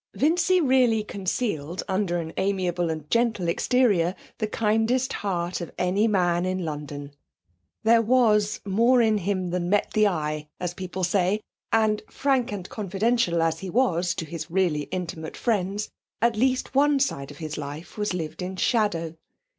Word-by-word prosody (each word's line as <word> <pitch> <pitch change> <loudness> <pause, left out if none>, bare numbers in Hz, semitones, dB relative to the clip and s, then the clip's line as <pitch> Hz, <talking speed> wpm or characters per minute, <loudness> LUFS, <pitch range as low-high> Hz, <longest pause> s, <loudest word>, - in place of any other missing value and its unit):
Vincy 350 +5 +3
really 255 -7 +3
concealed 185 - -3
under 190 -2 0
an 165 -1 -5
amiable 185 -3 0
and 155 -2 -4
gentle 230 -6 +1
exterior 190 -2 +2 0.2
the 215 - 0
kindest 225 +4 +1
heart 180 -3 -2
of 170 - -6
any 190 +5 +2
man 175 -4 +2
in 185 -1 -2
London. 145 -2 -6 0.7
There 225 +1 +5
was 215 -3 +3
'more 230 +6 +4
in 215 -2 +2
him 185 -1 -1
than 175 -1 -1
met 205 +1 +1
the 215 -1 +4
eye,' 155 -4 -2
as 180 -1 -3
people 185 0 -5
say, 185 +3 +2 0.3
and, 215 -1 +2
frank 265 -4 0
and 190 -3 -5
confidential 200 -3 0
as 160 0 0
he 190 - -6
was 180 -6 +1
to 165 - -4
his 160 0 -6
really 165 -5 +1
intimate 165 -3 -5
friends, 205 -2 -1 0.3
at 235 0 +2
least 255 +4 +1
one 285 +1 +4
side 140 - -1
of 145 - -11
his 155 -2 -5
life 145 +3 -7
was 210 -1 -1
lived 165 -1 -4
in 185 +1 -4
shadow. 185 -7 0
190 Hz, 160 wpm, -25 LUFS, 170-225 Hz, 0.7 s, There